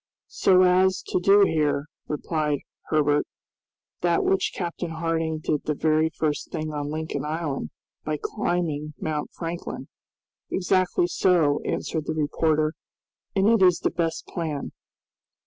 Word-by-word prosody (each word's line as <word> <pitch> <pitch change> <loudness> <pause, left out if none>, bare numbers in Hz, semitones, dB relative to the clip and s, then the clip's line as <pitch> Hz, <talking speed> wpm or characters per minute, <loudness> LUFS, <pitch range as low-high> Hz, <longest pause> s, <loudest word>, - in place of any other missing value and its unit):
"So 185 -1 +5
as 185 +1 +3
to - - +1
do 195 +3 +6
here," 150 -6 +2 0.2
replied 150 -1 -1 0.3
Herbert, 150 -1 +2 0.7
"that 170 -1 +2
which 195 0 +1
Captain 175 -1 -4
Harding 160 -1 -1
did 150 -2 0
the 150 - 0
very 155 +1 +2
first 150 -2 -1
thing 155 0 -3
on 145 -1 -3
Lincoln 155 +1 -3
Island, 150 - -3 0.3
by 155 0 -2
climbing 155 -4 -2
Mount 150 -2 -2
Franklin." 170 +1 -6 0.6
"Exactly 185 -1 +2
so," 170 -5 +2
answered 155 -2 -2
the 160 - -1
reporter, 155 0 +1 0.6
"and 195 +1 +3
it 225 -2 +4
is 180 -2 +6
the - - -1
best 165 -2 -2
plan." 155 -5 -4
160 Hz, 130 wpm, -25 LUFS, 150-175 Hz, 0.7 s, do